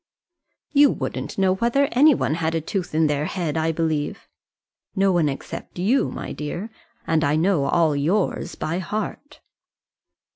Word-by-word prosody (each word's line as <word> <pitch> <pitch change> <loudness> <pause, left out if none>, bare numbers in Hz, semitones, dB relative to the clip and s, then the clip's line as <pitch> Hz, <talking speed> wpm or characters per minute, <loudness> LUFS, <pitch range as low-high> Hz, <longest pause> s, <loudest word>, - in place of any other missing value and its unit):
"You 290 -1 +6
wouldn't - - -4
know 190 -1 +3
whether 240 +8 +2
any 285 +4 +6
one 130 - 0
had 160 0 -1
a 165 - 0
tooth 180 0 -4
in 160 0 +4
their 150 0 0
head, 165 -3 -3
I 160 0 +1
believe." 160 -2 -2 0.7
"No 195 0 +3
one 170 -5 +2
except 135 - -7
you, 215 +10 +2
my - - -6
dear; 175 +9 -5 0.3
and 160 -1 +1
I 145 0 +2
know 165 -3 +2
all 160 -3 +2
yours 175 +8 0
by 165 +3 -2
heart." 215 +9 -5
170 Hz, 155 wpm, -23 LUFS, 155-200 Hz, 0.7 s, You